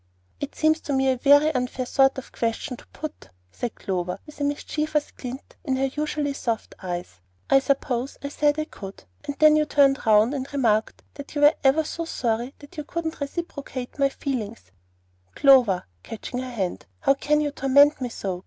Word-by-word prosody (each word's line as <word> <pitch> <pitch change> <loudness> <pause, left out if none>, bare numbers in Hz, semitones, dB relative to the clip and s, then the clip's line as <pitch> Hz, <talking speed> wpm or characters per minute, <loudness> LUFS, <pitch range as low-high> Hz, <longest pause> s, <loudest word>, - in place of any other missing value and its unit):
"It 285 - -5
seems 315 0 +3
to 285 - -3
me 265 0 +2
a - - +1
very 285 +4 +5
unfair 255 0 -2
sort 270 +1 +3
of 265 - -8
question 235 +3 -2
to - - -17
put," 305 0 -8 0.2
said 240 -2 -4
Clover, 180 -2 -3
with 300 -1 -12
a - - +1
mischievous 300 +1 -1
glint 255 +2 -9
in 265 -3 0
her 270 0 0
usually 300 -1 -1
soft 230 -4 -3
eyes. 175 - -5 0.4
"Suppose 265 -2 -1
I 280 - -3
said 290 +1 +1
I 310 - -1
could, 195 -9 -10 0.2
and 285 - -4
then 310 -1 +6
you 305 0 +3
turned 280 -1 +3
round 215 +4 +5
and 270 -1 -4
remarked 230 -6 +1
that 285 +1 -10
you 290 - 0
were 295 +2 +7
ever 275 +4 +4
so 335 +2 -4
sorry 240 -3 -2
that 290 +4 -15
you 300 - -3
couldn't 325 +1 -4
reciprocate 285 -4 -5
my 275 0 +4
feelings 230 - -5 0.3
" 90 0 -39
"Clover," 250 -10 +5 0.2
catching 230 - -6
her 255 0 -5
hand, 195 - -3
"how - - +4
can 300 +2 +1
you 295 -1 0
torment 280 +1 +4
me 250 - -2
so? 190 -5 -4
270 Hz, 190 wpm, -24 LUFS, 235-295 Hz, 0.4 s, were